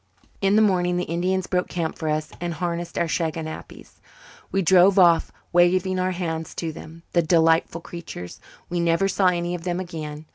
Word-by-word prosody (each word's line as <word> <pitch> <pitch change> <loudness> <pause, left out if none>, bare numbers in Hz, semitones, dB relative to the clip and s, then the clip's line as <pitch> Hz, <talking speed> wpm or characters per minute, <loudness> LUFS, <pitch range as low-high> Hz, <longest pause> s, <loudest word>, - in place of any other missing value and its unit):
In 195 +1 +3
the 220 - +5
morning 180 -3 +2
the 180 - 0
Indians 180 +3 -1
broke 180 0 -1
camp 165 -2 -3
for 160 - -3
us 155 0 -2
and 170 -1 -3
harnessed 170 0 -3
our 170 - +2
shaganappies. 160 -1 -5 0.5
We 195 - +1
drove 185 +2 +5
off, 170 -3 +5 0.2
waving 185 +1 +3
our 185 0 +1
hands 165 -3 -4
to 165 -2 -3
them, 165 +2 -11
the 170 - +4
delightful 165 0 +2
creatures. 170 - -8 0.3
We 175 0 -2
never 170 +3 +2
saw 195 0 +2
any 175 -1 0
of 175 -2 -5
them 175 0 -2
again. 155 -4 -6
175 Hz, 180 wpm, -23 LUFS, 165-185 Hz, 0.5 s, the